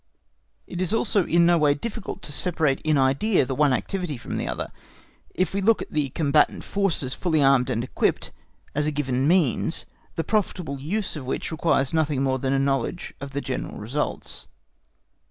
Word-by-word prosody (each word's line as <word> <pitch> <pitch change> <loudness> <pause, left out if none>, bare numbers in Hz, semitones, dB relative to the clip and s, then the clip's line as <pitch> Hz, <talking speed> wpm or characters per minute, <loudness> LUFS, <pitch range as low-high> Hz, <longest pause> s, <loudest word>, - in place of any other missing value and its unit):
It 175 - -5
is 185 +4 +1
also 210 -4 +1
in 170 0 +4
no 170 0 +4
way 145 -2 +4
difficult 220 +5 -6
to - - -3
separate 155 -3 +1
in 155 -1 +2
idea 135 +7 +3
the 135 - -3
one 145 +1 +3
activity 180 +2 -2
from - - -5
the - - -2
other, - - -4 0.6
if 185 0 0
we 200 - 0
look 220 +3 +4
at - - -14
the 150 -3 0
combatant 150 +1 +2
forces 180 -10 0
fully 165 -4 0
armed 135 -2 +4
and 120 -2 0
equipped 130 - -1 0.4
as 150 +1 0
a - - +1
given 135 -2 0
means, 170 -6 +2 0.3
the 165 - -1
profitable 180 -9 -1
use 185 +9 -2
of 145 -4 -6
which 135 - -3
requires 155 -4 +1
nothing 150 -4 +1
more 130 -1 +1
than 130 +1 -1
a 135 - +2
knowledge 135 +4 -1
of 140 - -5
their 140 +1 -4
general 130 0 -4
results. 125 +8 -4
150 Hz, 185 wpm, -25 LUFS, 135-175 Hz, 0.6 s, in